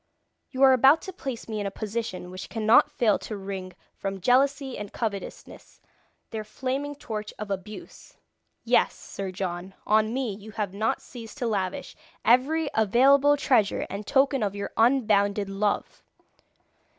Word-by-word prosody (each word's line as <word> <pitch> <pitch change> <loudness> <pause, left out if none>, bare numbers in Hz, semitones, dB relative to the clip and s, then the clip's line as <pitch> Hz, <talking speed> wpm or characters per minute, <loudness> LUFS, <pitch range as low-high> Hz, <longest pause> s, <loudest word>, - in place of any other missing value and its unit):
You 265 0 0
are 265 -1 +8
about 270 +5 +5
to 380 - -7
place 265 -9 -6
me 215 -2 -4
in 205 - -2
a - - -1
position 205 -3 -5
which 185 +1 -8
cannot 225 +5 +4
fail 235 -8 +2
to 215 - -6
wring 190 -1 -6 0.2
from 195 0 -4
jealousy 270 +4 +2
and 205 0 -7
covetousness 205 -4 -6 0.5
their 220 -1 -4
flaming 270 +6 -4
torch 215 -6 -6
of 210 -1 -6
abuse. 195 +2 -8 0.5
Yes, - - +2
Sir 195 -1 -7
John, 185 0 -5
on 215 +1 +3
me 250 -3 -2
you 210 +2 -11
have 205 -3 -3
not 215 +3 -1
ceased 230 0 -10
to 255 - -2
lavish 195 -5 -2 0.3
every 280 +7 +3
available 270 +7 +4
treasure 235 -7 +2
and 200 +2 -6
token 270 -1 +3
of 205 -2 -1
your 200 - -4
unbounded 210 -5 +2
love. 200 +1 -2
220 Hz, 150 wpm, -26 LUFS, 200-260 Hz, 0.5 s, are